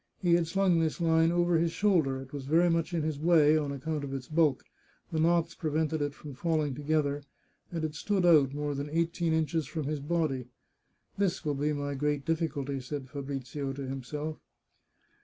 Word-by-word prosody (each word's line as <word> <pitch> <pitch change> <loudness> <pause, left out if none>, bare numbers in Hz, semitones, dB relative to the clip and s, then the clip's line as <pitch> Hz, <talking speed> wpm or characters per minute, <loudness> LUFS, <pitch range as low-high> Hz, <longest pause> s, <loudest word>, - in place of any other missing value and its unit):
He 175 -3 +2
had 170 -1 +3
slung 185 -1 +2
this 160 0 0
line 165 -1 +3
over 175 -1 +2
his 165 0 +1
shoulder; 165 -10 +2
it 135 - -16
was 135 -2 -6
very 170 +4 +4
much 165 +1 0
in 165 -3 -1
his 155 -2 -2
way, 155 -2 +5
on 150 -2 0
account 145 +2 -3
of 135 -1 -4
its 130 -2 -6
bulk; 155 -4 +2 0.5
the 160 - -1
knots 170 +1 +2
prevented 155 -1 -1
it 145 -1 -2
from 145 -2 -9
falling 155 0 0
together, 145 0 0 0.5
and 165 -2 -3
it 155 - -3
stood 190 +3 0
out 150 -6 +6
more 145 0 -2
than 140 +1 -4
eighteen 170 +1 0
inches 160 -1 0
from 155 +1 -4
his 150 +1 -2
body. 145 -4 -1 0.4
" - - -43
This 190 -4 0
will 150 - +1
be 145 +2 0
my 145 -1 -2
great 145 0 -1
difficulty," 155 -4 -1
said 130 0 -6
Fabrizio 140 0 -4
to 135 0 -5
himself. 145 +4 -5
155 Hz, 195 wpm, -30 LUFS, 140-165 Hz, 0.5 s, out